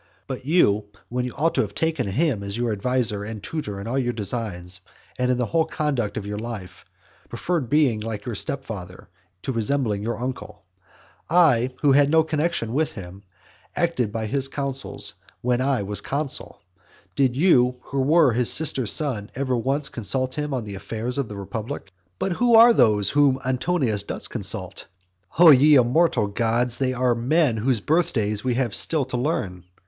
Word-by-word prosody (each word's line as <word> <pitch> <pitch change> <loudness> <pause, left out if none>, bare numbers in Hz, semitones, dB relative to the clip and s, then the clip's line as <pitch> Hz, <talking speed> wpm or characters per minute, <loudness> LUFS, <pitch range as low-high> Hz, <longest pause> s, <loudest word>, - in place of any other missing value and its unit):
But 130 -1 -7
you, 110 - +3 0.2
when 125 +1 -2
you 125 - -5
ought 165 +3 +1
to - - +2
have 100 -2 -5
taken 160 -8 -1
him 130 - 0
as 100 +1 -5
your 120 -1 -1
adviser 105 -1 -1
and 105 -1 -7
tutor 105 -9 -5
in 100 - -7
all 125 +4 -1
your 120 -2 -1
designs, 100 -5 -4 0.4
and 125 0 +1
in 125 - +2
the 125 - 0
whole 160 +5 +1
conduct 125 -9 -2
of 100 - -4
your 105 0 -4
life, 110 -5 -8 0.4
preferred 165 -9 -2
being 140 -7 +2
like 105 -1 -5
your 120 - -4
stepfather 105 -7 -5 0.3
to - - -2
resembling 115 -3 0
your 115 +3 -3
uncle. 125 -4 -6 0.7
I, 150 -8 +4
who 145 - +5
had 140 +1 +4
no 160 +1 +4
connexion 155 -7 -1
with 155 +3 0
him, 95 -1 -10 0.5
acted 165 - 0
by 110 0 -3
his 135 +4 +1
counsels 135 -1 -4 0.3
while 125 0 0
I 130 -5 0
was 100 +1 -4
consul. 140 -7 -3 0.5
Did 130 -3 +2
you, 125 -6 +3
who 135 0 -2
were 150 -1 +4
his 120 0 +1
sister's 130 -8 +3
son, 125 -9 0
ever 130 -1 -1
once 135 +4 -1
consult 130 +3 -2
him 150 0 -3
on 130 -3 -2
the 105 -1 -7
affairs 115 +6 -4
of 135 - -2
the 105 - -7
republic? 105 0 -6 0.3
But 190 - -2
who 235 +6 +3
are 230 +1 +8
they 105 - +3
whom 145 -2 +4
Antonius 130 - 0
does 100 - -4
consult? - - -2 0.5
O 170 -1 +9
ye 145 +2 +6
immortal 130 0 +3
gods, 115 +4 -1
they 130 -1 +1
are 125 -1 +1
men 125 +1 +1
whose 115 0 0
birthdays 110 - 0
we 125 -2 0
have 120 -4 -1
still 155 +3 +4
to 130 -1 -4
learn. 95 - -2
125 Hz, 180 wpm, -23 LUFS, 110-145 Hz, 0.7 s, O